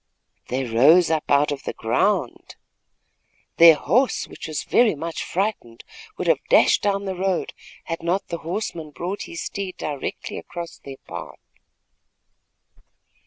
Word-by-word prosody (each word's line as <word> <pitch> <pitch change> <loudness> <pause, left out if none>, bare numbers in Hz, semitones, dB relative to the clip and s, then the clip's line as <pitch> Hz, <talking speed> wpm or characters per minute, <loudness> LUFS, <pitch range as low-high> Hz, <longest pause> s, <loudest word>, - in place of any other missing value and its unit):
"They 130 +2 -1
rose 145 +9 +5
up 155 -2 -1
out 145 +1 +3
of 145 - -4
the - - -5
ground." - - -1 1.0
Their 165 -1 +9
horse, 250 - +1
which - - -9
was 155 -2 -3
very 235 -7 +3
much 165 +3 -4
frightened, 185 - -3 0.3
would - - -3
have - - +2
dashed - - +5
down 200 0 0
the 190 - -2
road 185 0 -1 0.3
had 165 - -5
not 175 +4 -1
the 170 - -4
horseman 165 -2 -4
brought 175 +7 -5
his 170 - -5
steed 195 -2 -5
directly 145 -3 -5
across 170 -1 -8
their 135 -1 -10
path. - - -8
170 Hz, 140 wpm, -23 LUFS, 150-190 Hz, 1.0 s, Their